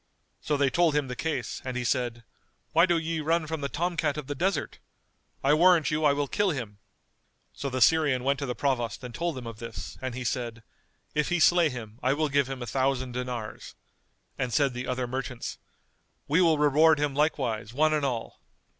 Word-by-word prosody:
So 150 - -1
they 140 -1 +2
told 170 0 +3
him 145 -3 0
the 125 - -4
case 135 -6 -3
and 130 -1 -4
he 125 - -2
said, 120 -2 -1 0.5
"Why 165 +3 +5
do 175 -1 +3
ye 165 0 -2
run 160 +1 +1
from 160 -1 -4
the 140 - -2
tom 175 +4 -1
cat 150 -2 0
of 150 - -4
the 145 - -3
desert? 185 +8 -1 0.6
I 140 +2 +4
warrant 165 -3 +5
you 155 0 +1
I 145 - +6
will 140 0 0
kill 205 +7 +1
him." 115 - -4 0.7
So 140 - -4
the 130 -1 -3
Syrian 145 -2 +3
went 140 +1 +1
to 140 - -3
the 125 - -3
Provost 125 -4 -1
and 125 -1 -7
told 170 -1 -2
him 125 - -7
of 115 -1 -8
this 115 -6 -7
and 130 -2 -4
he 130 - -4
said, 115 -2 -3 0.5
"If 150 0 0
he 175 0 +1
slay 175 0 +5
him, 115 -3 -8
I 130 +2 +2
will 155 +1 0
give 140 -1 +2
him 130 -2 -5
a - - -4
thousand 130 +1 0
dinars," 125 -3 -5 0.6
and 125 - -1
said 135 +3 +2
the 125 +1 -5
other 125 0 -1
merchants, 130 -1 -5 0.7
"We 160 +6 +3
will 165 -3 +4
reward 150 +2 +5
him 145 -1 0
likewise 120 -8 0
one 155 +5 +2
and 150 -1 0
all." 125 -5 -3
140 Hz, 210 wpm, -27 LUFS, 125-155 Hz, 0.7 s, I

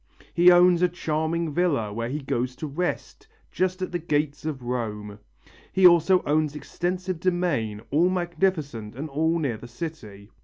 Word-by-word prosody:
He 175 +1 +6
owns 175 0 +5
a 180 - +4
charming 160 -1 -2
villa, 140 - 0
where 115 +2 -3
he 150 +4 -3
goes 125 -1 -2
to 155 - -6
rest, 180 - -4 0.2
just 185 0 -1
at - - -4
the 175 - -2
gates 150 -2 -1
of 145 -5 -4
Rome. 105 -4 -4 0.5
He 190 - +3
also 180 +1 +6
owns 150 0 0
extensive 180 +3 -3
domains, 170 - -1
all 165 +6 +3
magnificent 170 - -2
and 150 +4 -5
all 160 +4 +1
near 135 -9 -2
the 120 - -11
city. 120 -7 -8
155 Hz, 160 wpm, -25 LUFS, 125-175 Hz, 0.5 s, He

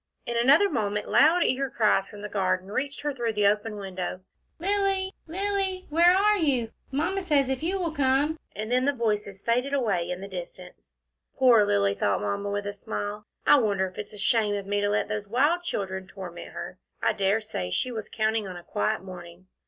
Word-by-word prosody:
In 235 - -3
another 275 +11 +5
moment 210 - -2
loud 335 +4 +5
eager 270 +1 0
cries 210 -4 +2
from 205 0 -11
the - - -3
garden 190 -1 -1
reached 280 +5 -3
her 295 0 -1
through 235 -4 -2
the 210 -1 +1
open 210 +2 +1
window. 190 -2 -5 0.4
"Lilly, 390 +1 +1
Lilly, 385 +1 -1
where 345 +3 +6
are 415 +2 +4
you? 255 -8 +1 0.2
Mamma 345 +8 0
says 290 -7 +2
if 265 -1 -1
you 360 +5 0
will 345 -4 -1
come 285 +2 +1
" - - -38
and 215 +2 -4
then 255 +1 +3
the 285 - +2
voices 210 -5 -2
faded 250 +4 +1
away 195 -10 0
in 180 0 -3
the 195 - -7
distance. 180 -1 -10 0.4
"Poor 245 -5 +6
Lilly," 100 0 +2
thought 100 0 0
Mamma, 105 - -2
with 205 0 -2
a 205 - -3
smile. 205 0 -5 0.2
"I 290 - +7
wonder 200 -5 +1
if 185 -1 -8
it's 210 - -6
a - - -9
shame 210 0 +2
of 200 -1 -4
me 205 +1 0
to 205 - +1
let 210 - +1
those 210 -1 -4
wild 290 - +2
children 190 - -4
torment 185 -3 -8
her. - - -8 0.2
I - - +2
dare 200 +2 +2
say 215 - -5
she 250 - -1
was 220 -3 -6
counting 220 -1 0
on 180 -1 -7
a 175 - -10
quiet 105 - -1
morning." 180 -1 -11
220 Hz, 205 wpm, -26 LUFS, 195-285 Hz, 0.4 s, I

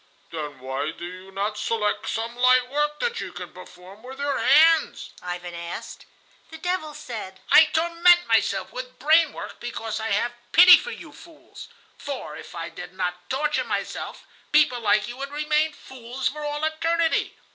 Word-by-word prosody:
"Then 150 -4 -6
why 130 +3 -3
do 170 +2 -8
you 185 +2 -10
not 205 +2 -3
select 215 -2 -1
some 230 +1 -3
light 255 0 +4
work 295 +1 0
that 480 -1 -1
you - - -6
can - - -9
perform 185 +3 -13
with 260 +3 -10
your 285 -1 -1
hands?" 325 +1 +4
Ivan 180 0 -6
asked. 170 0 -8 0.4
The 320 - -9
devil 320 -3 -3
said: 200 -6 -7
"I 315 - +9
torment 340 +2 +4
myself 215 -3 +1
with 255 0 -7
brain 315 +2 +4
work - - -9
because 225 -2 -5
I 220 - -3
have 235 +4 0 0.2
pity 360 +1 +10
for - - -7
you - - -9
fools, 330 -3 -14 0.3
for, 265 - -6
if - - -11
I 165 0 -5
did - - -10
not 180 -1 -4
torture 295 +3 0
myself, - - -5 0.3
people 295 -5 +4
like 210 -2 +2
you 240 +1 -8
would 275 +1 -5
remain 300 +1 +1
fools 255 0 -5
for 300 +1 -8
all 295 +1 -3
eternity. 330 +1 0
255 Hz, 170 wpm, -24 LUFS, 200-305 Hz, 0.4 s, pity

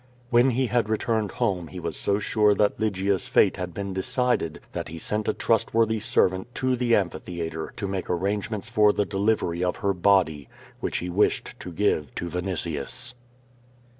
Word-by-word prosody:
When 120 +2 +5
he 130 +1 +1
had 120 -3 0
returned 110 -1 0
home 100 -9 -1
he - - -8
was - - -4
so 100 - 0
sure 105 0 +3
that 105 0 +1
Lygia's 100 -3 0
fate - - +3
had 90 -1 -4
been 100 +2 -4
decided, 95 -3 0
that - - -4
he 80 +1 -8
sent 105 +6 -2
a - - +2
trustworthy 115 0 +2
servant 110 -1 +1
to 130 -1 +1
the 120 -2 +2
amphitheatre 85 -4 -3
to 105 - -4
make 95 -1 -4
arrangements 100 +4 -1
for 105 -3 +4
the 105 - +1
delivery 95 -3 0
of 90 - 0
her 100 - +3
body, 90 -7 +2 0.3
which - - -2
he 90 - -3
wished 100 +4 +1
to 90 - -7
give 80 -6 0
to - - -3
Vinitius. 95 +7 -3
100 Hz, 170 wpm, -25 LUFS, 90-110 Hz, 0.3 s, When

